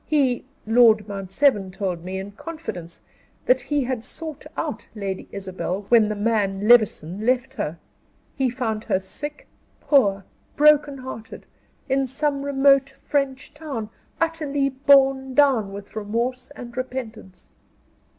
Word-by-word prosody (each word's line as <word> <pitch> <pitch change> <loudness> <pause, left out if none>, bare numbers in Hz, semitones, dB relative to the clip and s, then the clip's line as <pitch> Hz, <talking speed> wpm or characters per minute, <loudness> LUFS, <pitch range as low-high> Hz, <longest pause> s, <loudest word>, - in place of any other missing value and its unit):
He 270 -6 +1 0.2
Lord 220 -2 +5
Mount 195 -2 -6
Severn 210 -5 +3
told 185 -3 -4
me, 185 +1 -4
in 195 +1 -6
confidence, 200 - -8 0.4
that - - +4
he 290 -2 0
had 250 -2 -3
sought 310 +3 -6
out - - -4
Lady 195 -3 -4
Isabel 190 0 -4
when 225 -3 +5
the 215 - -2
man, 205 -2 0
Levison, 215 -5 +4
left 255 +2 +1
her; 170 - -4 0.6
he 265 -2 +1
found 230 -3 -3
her 185 - +1
sick, 295 +10 -7 0.3
poor, 200 -9 +3 0.3
broken 295 -1 +4
hearted, 255 -4 -9 0.4
in 270 0 +1
some 280 +2 -1
remote 275 -1 +4
French 270 -1 -3
town, 275 -9 -6 0.3
utterly 300 -4 0
borne 270 -1 +4
down 260 -9 +4
with 200 +1 -10
remorse 235 +4 -2
and 240 -2 -9
repentance." 235 -7 -7
245 Hz, 130 wpm, -23 LUFS, 205-275 Hz, 0.6 s, Lord